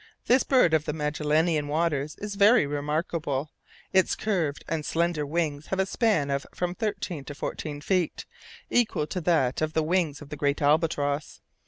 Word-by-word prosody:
This 255 +2 +4
bird 250 - +3
of 155 -1 +2
the 150 - -2
Magellanian 150 +1 +1
waters 150 -1 0
is 205 0 -6
very 205 -1 +5
remarkable; 145 0 -2 0.4
its 190 -1 +3
curved 175 -9 -1
and 160 -2 -2
slender 165 -2 0
wings 155 -2 -2
have 190 - -2
a 190 - +3
span 190 -9 +1
of 140 0 -2
from 180 0 -1
thirteen 200 -7 -3
to 145 - -7
fourteen 145 0 -5
feet, 180 +1 0 0.5
equal 220 -10 +2
to 180 +4 -4
that 155 -7 +1
of 155 0 -1
the 160 - +1
wings 160 -3 0
of 150 - -12
the 150 - -5
great 140 0 0
albatross. 145 -1 +1
155 Hz, 170 wpm, -27 LUFS, 145-180 Hz, 0.5 s, very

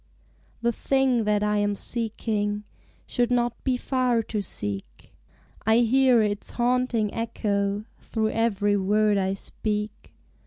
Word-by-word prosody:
The 235 - +3
thing 260 -1 +1
that 210 0 +2
I 210 0 +1
am 205 0 +1
seeking 210 -2 -2 0.4
Should 245 -2 0
not 240 -1 0
be 255 -2 +1
far 250 -3 +1
to 215 -1 -3
seek; 100 - -5 0.5
I 220 +1 +4
hear 250 0 +4
its 205 -1 -2
haunting 240 -3 +1
echo 205 -3 -1
Vigils - - -18
Through 220 -1 -1
every 205 -3 +1
word 205 +1 +2
I 190 0 0
speak. 210 +1 -4
215 Hz, 130 wpm, -25 LUFS, 205-240 Hz, 0.5 s, I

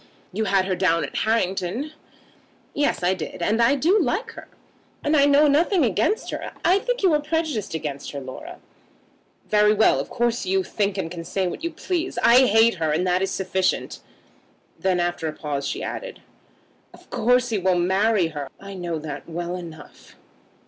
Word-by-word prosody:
"You 220 +3 -1
had 195 -2 +2
her 190 - -1
down 170 -3 +2
at - - -10
Harrington." 220 - -1 0.8
"Yes; 290 -10 0
I 180 +1 +3
did. 175 -1 -6
And 220 +6 +1
I 235 +5 +4
do 350 +9 +3
like 405 - -1
her. - - -11 0.6
And 305 - +2
I 285 -1 +5
know 285 +1 +5
nothing 320 +3 +3
against 225 - 0
her. - - -5
I 365 +4 +5
think - - -2
you 365 -4 +4
are 300 - +2
prejudiced 305 - -2
against 150 -3 -5
her, 140 - -5
Laura." 130 -1 -9 0.9
"Very 210 0 +4
well. 220 - +4
Of - - -4
course 240 0 0
you 190 0 +1
think 200 0 -2
and 165 -4 -3
can 170 -2 -6
say 185 +3 -2
what 180 - -5
you 335 - 0
please. 350 +1 -3
I 250 +2 +7
hate 225 +2 +5
her, 160 -2 0
and 165 +4 0
that 180 0 +1
is 195 - 0
sufficient." 190 -1 -1 0.8
Then, 185 -2 +1
after 175 -2 -1
a 155 - -3
pause, 145 -3 -4
she - - -4
added, - - -6 0.7
"Of - - -21
course 245 +2 +2
he 215 -3 0
will 185 -1 +2
marry 190 +1 +2
her. 145 -3 -6
I 195 0 -9
know 175 -3 -4
that 150 0 -7
well 175 +2 -4
enough. 165 -4 -11
195 Hz, 185 wpm, -23 LUFS, 175-270 Hz, 0.9 s, I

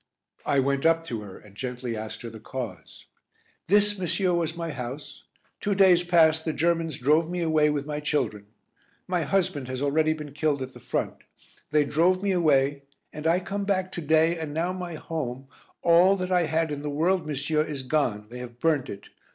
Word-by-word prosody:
I 140 - +3
went 135 +1 +1
up 165 0 +3
to 115 -8 -4
her 100 -2 -10
and 105 -2 -17
gently 125 0 -4
asked 110 +1 -6
her 115 - -5
the 110 - -10
cause. 110 -8 -7 0.6
"This, 205 +1 +4
monsieur, 185 0 +1
was 170 -1 -1
my 165 -1 -3
house. 140 +2 -7 0.3
Two 200 -1 -1
days 185 -3 +6
past 160 -3 +4
the 160 - -2
Germans 165 0 0
drove 155 +6 +2
me 180 0 -2
away 155 -2 +3
with 145 -1 -2
my 150 0 -3
children. 125 -9 -2 0.6
My 180 -1 0
husband 170 -4 0
has 130 0 -4
already 155 +3 +2
been 150 -2 -8
killed 145 -2 0
at 130 0 -8
the 125 - -12
front. 125 +1 -3 0.5
They 150 -1 +3
drove 175 +6 +2
me 200 - +1
away, 145 -5 +2 0.3
and 155 +1 -3
I 170 +3 +3
come 200 +2 -3
back 190 -2 -1
to 170 - -5
day 160 +2 +3
and 155 -2 -5
now 170 +3 0
my 180 -3 -5
home, 135 -5 -5 0.4
all 175 +3 +6
that 185 -1 -4
I 180 -2 +3
had 160 0 0
in 145 -1 -4
the 150 - -4
world, 165 +4 +1
monsieur, 150 +1 0
is 145 -4 -5
gone. 125 -7 0
They 125 - -7
have 120 -1 -9
burnt 150 -4 +1
it. 100 - -9
155 Hz, 200 wpm, -26 LUFS, 135-170 Hz, 0.6 s, days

